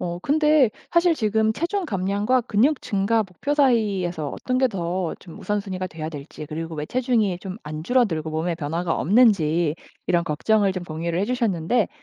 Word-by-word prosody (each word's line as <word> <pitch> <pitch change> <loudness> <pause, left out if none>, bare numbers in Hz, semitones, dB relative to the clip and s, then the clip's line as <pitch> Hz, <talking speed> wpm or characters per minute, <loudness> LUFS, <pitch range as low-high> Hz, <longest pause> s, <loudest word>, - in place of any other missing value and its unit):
어 175 0 -3
근데 300 -4 +4 0.2
사실 340 0 +4
지금 220 0 +1
체중 350 - -2
감량과 205 - 0
근육 250 +7 +2
증가 210 +2 +1
목표 190 - -4
사이에서 200 - +1
어떤 255 0 -2
게 260 -1 +3
더 180 -3 -2
좀 170 - -12
우선순위가 195 -3 -3
돼야 160 -2 -6
될지 150 0 -8
그리고 160 +2 -5
왜 150 0 -4
체중이 235 -7 +1
좀 190 0 -6
안 155 +1 -6
줄어들고 170 -8 +1
몸에 165 +2 -1
변화가 165 +2 -2
없는지 175 -7 +3 0.3
이런 170 -1 +2
걱정을 200 +6 +2
좀 185 -2 -5
공유를 165 +1 -3
해 200 - +1
주셨는데 225 -3 0
195 Hz, 355 characters per minute, -23 LUFS, 165-235 Hz, 0.3 s, 근데